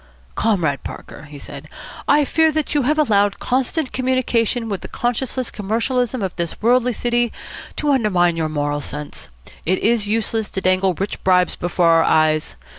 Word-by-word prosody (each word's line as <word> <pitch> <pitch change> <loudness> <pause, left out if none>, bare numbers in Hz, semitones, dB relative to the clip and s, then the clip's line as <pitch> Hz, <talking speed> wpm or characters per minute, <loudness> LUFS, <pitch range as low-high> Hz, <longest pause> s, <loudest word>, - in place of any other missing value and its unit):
"Comrade 175 -11 0
Parker," - - -9
he 145 0 -11
said, - - -10 0.4
"I 290 0 +4
fear 320 +2 +3
that 310 -1 -1
you 295 - +2
have 295 +4 +1
allowed 205 -9 +2
constant 260 +3 -1
communication 250 -2 0
with 200 -4 -3
the - - -7
conscienceless 245 +1 -2
commercialism 235 +3 -1
of 190 - -3
this 170 -1 -3
worldly 245 +2 +3
city 240 +1 0 0.4
to 295 -1 0
undermine 185 -10 +2
your 160 -1 -1
moral 145 -1 -1
sense. 145 +1 -7 0.3
It 185 +3 +1
is 225 -2 +1
useless 220 0 -1
to 190 - -4
dangle 185 0 +2
rich 195 +4 -4
bribes 180 -1 +3
before 175 0 0
our 165 0 +5
eyes. 155 - +2
215 Hz, 165 wpm, -20 LUFS, 175-250 Hz, 0.4 s, our